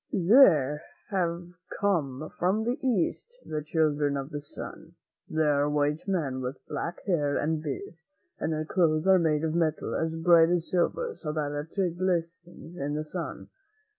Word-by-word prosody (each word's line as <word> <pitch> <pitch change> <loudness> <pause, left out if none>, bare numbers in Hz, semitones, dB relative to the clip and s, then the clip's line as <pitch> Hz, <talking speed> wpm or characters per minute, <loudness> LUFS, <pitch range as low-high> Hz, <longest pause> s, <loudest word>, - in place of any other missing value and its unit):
There 170 - +5 0.3
have 175 -2 -1 0.3
come 155 -8 0
from 190 +5 +2
the 245 +5 -1
East 260 - -1
the 155 -1 -3
Children 150 -2 +1
of 135 +2 -5
the 145 -1 -4
Sun. 145 - -10 0.3
They 160 0 +1
are 145 -1 +2
white 150 +3 0
men, 150 -9 -1
with 130 +2 -4
black 170 - -4
hair 150 -7 +1
and 155 +1 0
beards, 160 +3 -6 0.4
and - - -1
their 155 0 -2
clothes 155 -2 +2
are 190 -1 +6
made 155 -2 +1
of 160 -1 0
metal 160 -2 0
as 160 0 -1
bright 165 0 +5
as 175 -1 -1
silver, 465 - 0
so 150 - -5
that 150 -2 -2 0.3
it 180 -3 0
glistens 175 -1 -3
in 145 +1 -2
the 155 0 -3
sun. 165 -2 -6
160 Hz, 165 wpm, -28 LUFS, 150-175 Hz, 0.4 s, are